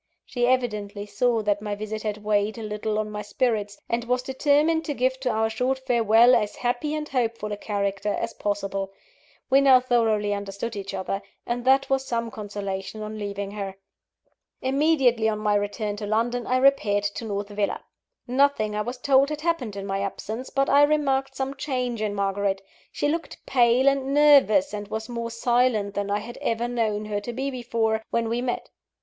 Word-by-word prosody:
She 245 -1 0
evidently 210 -5 -1
saw 230 +1 +1
that 205 0 +1
my 210 -1 -3
visit 215 +1 -5
had 210 -1 -4
weighed 210 +1 +1
a 225 - -6
little 210 0 -2
on 215 0 -2
my 210 0 -4
spirits, 210 -3 -1
and 235 0 -1
was 250 +1 0
determined 295 +5 +2
to 290 - -3
give 260 +1 0
to 260 -1 -1
our 220 -1 +1
short 250 +4 0
farewell 240 -2 +4
as 210 -3 +1
happy 245 +5 -1
and 305 0 -3
hopeful 230 -5 -1
a - - -1
character 200 -1 -2
as - - -3
possible. 195 -1 -3 0.6
We 270 +1 +6
now 265 -2 +7
thoroughly 225 -5 +1
understood 200 +3 -4
each 195 -1 -5
other; 195 +1 -3 0.2
and 240 +1 -3
that 270 +1 +4
was 270 0 +1
some 230 -3 -2
consolation 205 0 -5
on 215 0 -6
leaving 200 -1 -4
her. 200 -2 -5 0.8
Immediately 260 -5 +2
on 215 - -1
my 210 -1 +1
return 205 0 -1
to 205 -1 -5
London 235 +3 0
I 255 - +2
repaired 255 -7 +3
to 205 +3 -3
North 205 -1 -3
Villa. 205 0 -2 0.4
Nothing, 250 -5 +2
I 210 - 0
was 245 +4 -4
told, 275 +2 +3
had 300 -1 -4
happened 300 - -1
in 195 -1 -5
my 195 0 -2
absence, 220 +5 -4
but 275 0 +1
I 285 - +5
remarked 275 -3 +2
some 270 0 -2
change 255 -5 -3
in 210 -1 -1
Margaret. 195 0 -1 0.3
She - - -1
looked 330 +3 -4
pale 250 0 +3
and 275 0 +2
nervous, 290 -3 +5
and 205 -1 -5
was 220 +1 -4
more 235 -1 -4
silent 230 -3 +1
than 200 0 -2
I 205 - +1
had 240 +3 -9
ever 230 +1 0
known 220 -3 -1
her 210 -1 -2
to 240 - -5
be 270 +3 -2
before, 230 -3 -1
when 230 -1 0
we 235 +1 -1
met. 250 -1 -3
230 Hz, 190 wpm, -25 LUFS, 205-260 Hz, 0.8 s, now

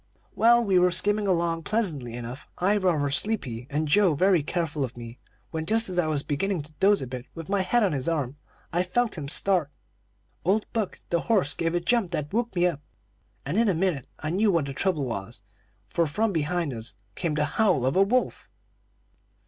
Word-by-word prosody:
"Well, 235 +1 +5
we 190 -3 +4
were 180 0 +4
skimming 205 +3 +1
along 170 -2 +1
pleasantly 160 - -1
enough, 120 +3 -7
I 195 +4 +2
rather 165 -8 +1
sleepy, 135 - -2
and 150 +2 -1
Joe 185 0 +4
very 185 +1 +3
careful 160 -1 -2
of 125 -1 -5
me, 120 +1 -9 0.3
when, 160 0 -4
just 225 0 +3
as 180 -1 -1
I 165 - +2
was 150 -2 0
beginning 170 +3 -1
to 150 +1 -10
doze 200 -4 +4
a - - -3
bit 125 0 -7
with 165 0 -8
my 200 -1 +2
head 220 +6 +2
on 195 - +2
his 135 0 -1
arm 145 -5 -2 0.4
I 175 - +2
felt 225 +6 0
him 150 -5 -5
start. 175 0 +3 0.7
Old 200 +5 +2
Buck, 220 -4 -2
the 170 - +2
horse, 190 -11 +3
gave 165 +1 -1
a - - +2
jump 200 +2 +1
that 150 0 -3
woke 235 -1 -1
me 175 0 +3
up, 165 -5 -1 0.6
and 150 +8 -2
in 230 -1 +4
a 185 - +1
minute 165 -6 -1
I 155 - -4
knew 205 +4 +3
what 165 -5 +1
the 140 - -5
trouble 155 -2 0
was, 110 -2 -6 0.4
for 165 +10 0
from 215 +9 0
behind 160 -1 -1
us 110 -3 -7 0.2
came 165 - -2
the 150 -1 +1
howl 150 - +2
of 130 - +1
a 190 - +5
wolf. 245 +6 0
170 Hz, 205 wpm, -26 LUFS, 145-195 Hz, 0.7 s, Well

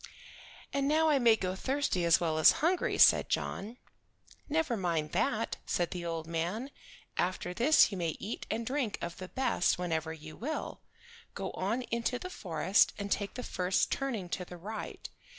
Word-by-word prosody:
"And 275 0 +1
now 315 +2 +3
I 290 -2 +4
may 235 -3 +6
go 185 -4 -2
thirsty 260 -6 0
as 170 -1 +5
well 160 -2 0
as 155 - +8
hungry," 360 +1 +1
said - - +6
John. 220 +5 -3 0.7
"Never 305 -5 +1
mind 165 -6 -1
that," 225 +4 0
said 175 -2 0
the 175 -1 -4
old 165 -1 -3
man. 175 - -3 0.5
"After 180 0 -1
this 250 +5 +5
you 195 - -4
may 165 -2 -2
eat 210 - -6
and 230 +1 -2
drink 255 -4 -1
of 170 0 -5
the 185 - -7
best 255 -8 +1
whenever 160 -3 -2
you 155 -1 -9
will. 310 +7 -4 0.5
Go - - -4
on 220 +7 -2
into 235 +1 -1
the 365 +8 -7
forest 175 - +2
and 200 -1 -5
take 200 -1 -1
the 250 - -5
first 185 -3 0
turning 240 -9 -2
to 180 - -3
the 180 0 -10
right. 215 +5 -6
200 Hz, 175 wpm, -31 LUFS, 175-250 Hz, 0.7 s, as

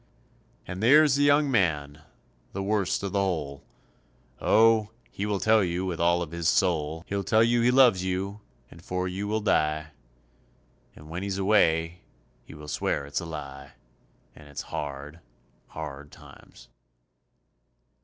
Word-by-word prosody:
And 90 +2 -7
there's 145 +5 +6
the 140 - +1
young 145 0 +3
man, 75 - 0 0.5
the 100 - -3
worst 100 -2 -1
of 100 - -3
the 100 - 0
whole. 80 -8 -2 0.8
Oh, 110 -1 +4 0.2
he 100 - -4
will 100 -2 -1
tell 110 0 +3
you 90 +1 -2
with 90 -3 -4
all 85 +1 +2
of 80 - -9
his 85 -1 0
soul, 80 -3 0
He'll 100 0 -3
tell 110 +3 +3
you 120 +1 +2
he 120 - +3
loves 125 -8 +5
you 95 +3 -3 0.3
and 85 - -15
for 90 0 -3
you 95 +3 -4
will 110 +1 -1
die, 75 -6 0 1.0
And 75 - -14
when 85 +3 -6
he's 100 -1 -3
away 85 -4 +2 0.4
he - - -13
will 75 0 -11
swear 75 -1 -2
it's 70 0 -3
a - - -7
lie, 70 -3 -8 0.6
And 75 - -15
it's 70 - -6
hard, 70 +2 -6 0.5
hard 75 -2 -8
times. - - -16
90 Hz, 155 wpm, -26 LUFS, 75-105 Hz, 1.0 s, there's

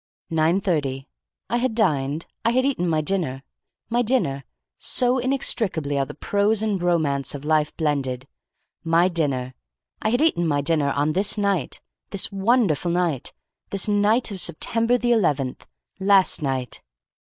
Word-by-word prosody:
"Nine 165 +3 +2
thirty. 140 -8 -1 0.4
I 240 - 0
had 245 -2 -1
dined. 150 - 0 0.2
I 230 - +2
had 255 +1 +2
eaten 255 -11 0
my 155 -1 +1
dinner. 150 -6 -2 0.4
My 235 +2 +1
dinner! 210 - 0 0.3
So 250 +1 +2
inextricably 210 - 0
are 135 - 0
the - - -9
prose 205 +6 +1
and 205 -4 -1
romance 150 -7 0
of 145 +1 -8
life 155 -1 +1
blended. 140 -5 -1 0.6
My 165 +2 +3
dinner! 135 -7 -1 0.5
I 215 - +1
had 245 +4 +1
eaten 175 - +2
my 145 -2 +1
dinner 150 -1 +1
on 145 +2 0
this 200 +5 +2
night. 200 -8 -1 0.3
This 200 - 0
wonderful 195 - +1
night. 170 -6 0 0.4
This 200 0 +1
night 210 +3 +2
of 190 -2 0
September 230 +8 +1
the 240 0 0
eleventh. 145 - 0 0.3
Last 195 -3 +4
night! 130 -4 -2
175 Hz, 150 wpm, -23 LUFS, 145-215 Hz, 0.6 s, Last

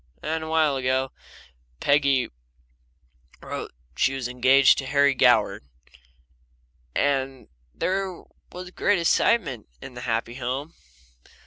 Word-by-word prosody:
Well, 155 - -4
then, 160 0 -1
awhile 160 -3 +1
ago 130 0 0 0.7
Peggy 140 -3 +2 1.1
wrote - - -6 0.2
she 135 - +1
was 130 -2 -3
engaged 130 +2 +4
to 135 - -5
Harry 140 0 +3
Goward, 130 - +3 1.3
and 135 -2 -1 0.3
there 190 -1 -2 0.3
was 180 0 -8
great 205 +2 +1
excitement 165 - +1
in 135 - -10
the 125 - -8
happy 115 -1 -2
home. 135 +5 -4
135 Hz, 110 wpm, -25 LUFS, 130-160 Hz, 1.3 s, engaged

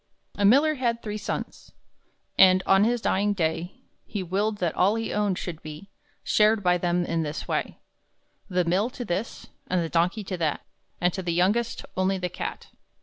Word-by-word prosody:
A 205 - 0
miller 280 +9 +5
had 240 -4 -1
three 210 -1 -4
sons, 200 - -6 0.6
And, 185 -1 +6
on 195 +2 +5
his 240 0 +1
dying 205 +1 +1
day, 165 -1 -2 0.2
He 205 -3 -4
willed 205 +4 -1
that 175 -5 -1
all 195 +4 +3
he 225 0 -3
owned 205 -3 0
should 165 -3 -6
be 155 +6 -10 0.3
Shared 215 0 +3
by 180 -1 +3
them 175 0 0
in 165 -1 -1
this 150 -1 -4
way: - - -2 0.7
The 180 -2 +1
mill 190 +7 +1
to 245 - -4
this, 190 +5 -4 0.2
and 185 - +1
the 165 - -4
donkey 180 +6 +1
to 190 -1 -4
that, 160 -4 -1 0.4
And 180 0 +1
to 190 - -3
the 175 -2 -2
youngest 205 +7 +1
only 185 +1 +1
the 180 -1 -3
cat. - - -6
190 Hz, 185 wpm, -26 LUFS, 175-210 Hz, 0.7 s, And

